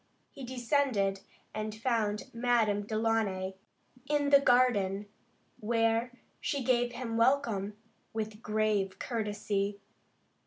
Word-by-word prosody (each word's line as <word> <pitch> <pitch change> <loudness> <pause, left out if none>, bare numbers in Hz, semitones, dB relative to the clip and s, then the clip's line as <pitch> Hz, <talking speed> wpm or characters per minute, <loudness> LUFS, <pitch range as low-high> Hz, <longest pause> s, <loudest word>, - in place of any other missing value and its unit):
He 275 - -10
descended, 245 -6 +1 0.3
and 215 0 -4
found 220 -2 -1
Madame 230 -4 +1
Delaunay 215 -4 0 0.6
in 290 -1 +1
the 280 - +9
garden, 235 -7 +3 0.5
where 225 +1 +1 0.3
she 280 -2 -2
gave 245 -1 +2
him 235 -2 -3
welcome, 230 -5 +1 0.3
with 215 -1 -4
grave 210 -3 0
courtesy. 205 -3 -2
225 Hz, 95 wpm, -31 LUFS, 205-245 Hz, 0.6 s, the